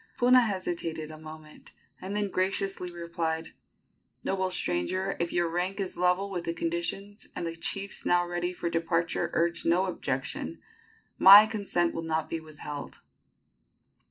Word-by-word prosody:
Puna 250 +1 +6
hesitated 170 -7 -2
a 155 - -10
moment, 155 -1 -12 0.3
and 195 +2 -5
then 205 -2 -1
graciously 190 0 -1
replied: 170 -2 -3 0.7
"Noble 190 -1 0
stranger, 185 - -1
if 170 0 -1
your 175 -1 +1
rank 180 +4 -2
is 190 -2 -3
level 180 +3 +1
with 175 -3 -3
the 165 - -2
conditions, 170 +5 -3
and - - -3
the 165 0 -4
chiefs 195 +4 -3
now 175 0 +3
ready 175 0 -2
for 175 -1 -4
departure 165 0 0
urge 170 0 +1
no 180 +3 +3
objection, 180 - -3 0.6
my 200 +3 +11
consent 200 -6 0
will 165 - -3
not 160 -1 -2
be 165 - -1
withheld." 150 -2 -8
175 Hz, 145 wpm, -28 LUFS, 165-195 Hz, 0.7 s, my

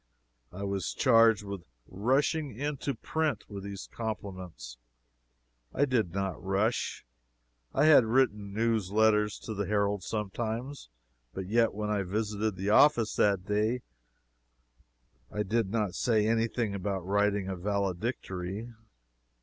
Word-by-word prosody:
I 95 +3 -7
was 100 -1 -2
charged 115 -2 +5
with 100 -2 -6 0.3
"rushing 135 +5 0
into 140 -1 -2
print" 160 +6 -2
with 100 -2 -7
these 100 -1 -7
compliments. 95 - -6 1.0
I 145 - +3
did 120 -10 0
not 95 -1 -3
rush. 100 - -1 0.7
I - - +3
had 150 -6 +7
written 110 -4 +1
news 110 -2 0
letters 105 0 +3
to 110 - -5
the 100 -2 -2
Herald 100 -1 +1
sometimes, 110 - -4 0.5
but 95 - -4
yet 115 +3 +2
when 105 0 -2
I 105 -1 +1
visited 105 +2 -2
the 95 +2 -1
office 120 -3 +5
that 100 -3 +2
day 110 +4 0 1.5
I 105 - -1
did 110 0 0
not 105 -3 -1
say 110 -2 +2
any 115 0 +2
thing 115 -3 -2
about 95 -2 -3
writing 100 0 +1
a 95 - -3
valedictory. 100 +2 -3
105 Hz, 130 wpm, -30 LUFS, 100-115 Hz, 1.5 s, had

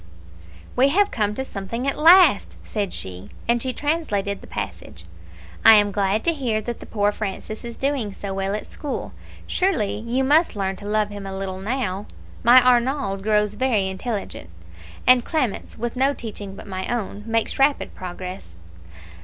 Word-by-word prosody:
"We 260 +2 +5
have 400 +7 +3
come 210 -2 0
to 265 - -3
something 230 +4 -4
at 275 - +1
last," 325 - +6
said 205 -4 -3
she, 95 +2 -7 0.2
and 235 0 +2
she 260 - -1
translated 245 -10 -1
the - - -13
passage, 85 - -7 0.6
"'I 225 - +10
am 205 -1 +4
glad 200 +1 0
to 335 - +2
hear 245 -8 -1
that 235 +2 -5
the - - -11
poor 205 -1 +1
Francis 215 +1 -5
is 235 -1 -7
doing 270 -6 -1
so 195 0 -6
well 195 +1 -1
at 210 - -5
school 290 -3 -5 0.3
surely 350 - 0
you 235 +4 -1
must 300 +1 +3
learn 195 -1 -1
to 205 - -10
love 210 0 +1
him 205 -1 -7
a 190 0 -5
little 190 -1 -4
now. 205 -2 -2 0.3
My 245 +2 +8
Arnauld 250 -4 +2
grows 210 0 +2
very 215 -4 +1
intelligent; 195 - -5 0.6
and 250 -1 +6
Clemence, 260 -9 -2
with 235 +2 -3
no 270 +2 +2
teaching 205 -4 -7
but - - -10
my 190 -2 -4
own, 210 -4 -3
makes 225 +2 0
rapid 280 +1 +2
progress.' 180 - -8
215 Hz, 170 wpm, -23 LUFS, 195-260 Hz, 0.6 s, I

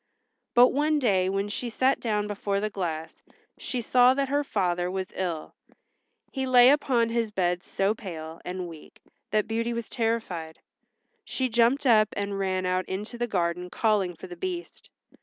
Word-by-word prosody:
But 245 +1 +8
one 300 +2 +1
day 195 -9 +2
when 195 +1 -1
she 235 +4 -4
sat 260 +3 +2
down 210 -3 -1
before 200 -1 -2
the 215 +1 -2
glass 165 -5 -4 0.4
she 250 - -3
saw 250 +2 +5
that 275 -1 0
her 290 +1 +1
father 180 -7 0
was 190 0 -2
ill. 175 -4 -4 0.8
He 265 -1 -2
lay 250 0 +7
upon 255 -5 +2
his 230 -1 0
bed 180 -3 0
so 195 +3 0
pale 165 -7 -8
and 180 0 -4
weak 160 -3 -13 0.3
that 215 0 +1
Beauty 230 +2 -1
was 235 -1 -4
terrified. 220 -9 -2 0.7
She 260 -1 -2
jumped 240 +5 +3
up 215 -4 +5
and 200 -1 -3
ran 185 -1 -1
out 185 0 0
into 210 +5 -5
the 240 - 0
garden 180 -3 -1
calling 200 -4 +1
for - - -10
the 180 -1 -9
Beast. 360 - -6
210 Hz, 170 wpm, -27 LUFS, 185-240 Hz, 0.8 s, But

